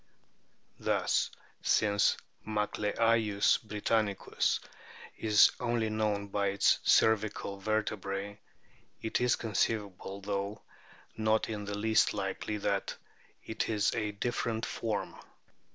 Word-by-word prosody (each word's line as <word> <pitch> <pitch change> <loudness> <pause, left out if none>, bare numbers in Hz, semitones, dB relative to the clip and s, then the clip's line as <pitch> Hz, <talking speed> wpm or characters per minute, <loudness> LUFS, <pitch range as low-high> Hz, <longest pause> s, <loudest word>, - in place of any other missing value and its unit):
Thus - - +1 0.3
since 100 -1 +3 0.3
Macleayius 105 0 +1
britannicus 105 -1 0 0.6
is 105 -2 +6
only 120 -3 0
known 105 -2 -1
by 100 0 0
its 100 0 +3
cervical 105 -2 +2
vertebrae, 100 -1 -2 0.6
it 110 - -1
is 125 -1 +3
conceivable, 100 -3 -2
though 100 +1 -3 0.5
not 110 0 +1
in 105 -2 -4
the 100 0 -4
least 110 +1 +3
likely, 100 +1 -3
that 100 -1 -1 0.5
it 110 - -2
is 105 -2 +1
a 110 -2 -1
different 115 +1 -2
form. 110 -3 -3
105 Hz, 100 wpm, -31 LUFS, 100-110 Hz, 0.6 s, is